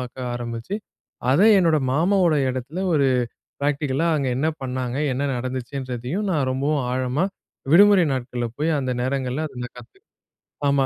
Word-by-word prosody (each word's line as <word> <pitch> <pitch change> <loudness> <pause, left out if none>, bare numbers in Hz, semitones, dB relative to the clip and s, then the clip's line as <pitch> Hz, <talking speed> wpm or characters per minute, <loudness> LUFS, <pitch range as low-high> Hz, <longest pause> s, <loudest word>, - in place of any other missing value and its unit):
ஆக்க 125 +1 -7 0.2
ஆரம்பிச்சு. 120 - -5 0.6
அத 140 - +4 0.2
என்னோட 165 -4 +3
மாமாவோட 175 +1 +3
எடத்துல 130 +9 -4
ஒரு 140 -3 +3 0.5
பிராக்டிகலா, 145 +2 0
அங்க 140 -3 0
என்ன 155 +4 +1
பண்ணாங்க, 130 0 -3 0.2
என்ன 135 +3 -2
நடந்துச்சுன்றதையும் 130 - -4
நான் 145 -5 +1
ரொம்பவும் 140 +1 0
ஆழமா 130 +6 0 0.5
விடுமுறை 200 -1 +7
நாட்கள்ல 120 -2 -3
போயி, 160 +2 +1
அந்த 130 -1 -2
நேரங்கள்ல 130 +3 -1
அத 125 - -13
நான் 125 - -13
கத்து 115 - -17 0.7
ஆமா, 140 -1 +3
135 Hz, 140 wpm, -23 LUFS, 125-155 Hz, 0.7 s, விடுமுறை